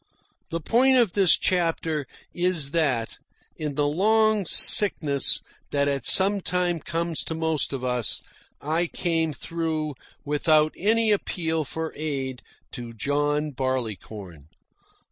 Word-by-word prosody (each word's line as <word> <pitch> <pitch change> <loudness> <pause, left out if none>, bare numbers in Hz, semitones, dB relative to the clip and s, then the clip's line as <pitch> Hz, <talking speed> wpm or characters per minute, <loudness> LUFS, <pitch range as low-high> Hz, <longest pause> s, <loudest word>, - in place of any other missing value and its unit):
The 165 - -4
point 255 - +2
of 235 -7 +2
this 195 -3 +3
chapter 165 -5 -2 0.3
is 175 -5 0
that, 140 -9 -2 0.4
in 150 -2 -5
the 145 0 0
long 215 +5 +1
sickness 150 -11 +6 0.3
that 140 0 -1
at 140 -1 -2
some 195 +1 +6
time 180 -2 -2
comes 165 +1 -4
to 160 - -5
most 160 -3 -2
of 135 -2 -6
us, 125 -2 -2 0.4
I 160 +4 -2
came 165 -2 -2
through 160 -1 -5 0.3
without 155 +1 +1
any 220 +3 +2
appeal 165 -5 -2
for 160 +3 -6
aid 135 -4 -5 0.3
to 120 -2 -9
John 145 +4 -2
Barleycorn. 110 - -6
155 Hz, 125 wpm, -23 LUFS, 140-175 Hz, 0.4 s, sickness